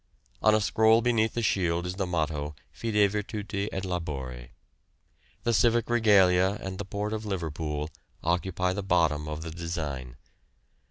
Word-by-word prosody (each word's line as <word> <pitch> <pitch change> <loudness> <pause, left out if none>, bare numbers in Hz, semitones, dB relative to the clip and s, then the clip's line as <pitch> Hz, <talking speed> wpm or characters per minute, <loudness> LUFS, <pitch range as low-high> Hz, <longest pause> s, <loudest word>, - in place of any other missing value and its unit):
On 110 0 +5
a 110 - +2
scroll 110 +2 +4
beneath 115 -2 +2
the 120 - -1
shield 85 -4 +1
is 90 - -3
the 95 0 -2
motto 75 -3 -2 0.2
'Fide 105 -3 +2
virtute 105 -1 -3
et 95 0 -3
labore.' 65 -9 -4 0.9
The 120 - +1
civic 120 +1 +3
regalia 100 -4 +4
and 95 0 -6
the 100 - -3
port 105 +2 -3
of 110 0 -3
Liverpool 80 -6 -3 0.4
occupy 90 +2 0
the 100 - -3
bottom 85 -5 +1
of 75 +1 -5
the 80 - -6
design. 75 -7 -5
95 Hz, 150 wpm, -28 LUFS, 80-105 Hz, 0.9 s, On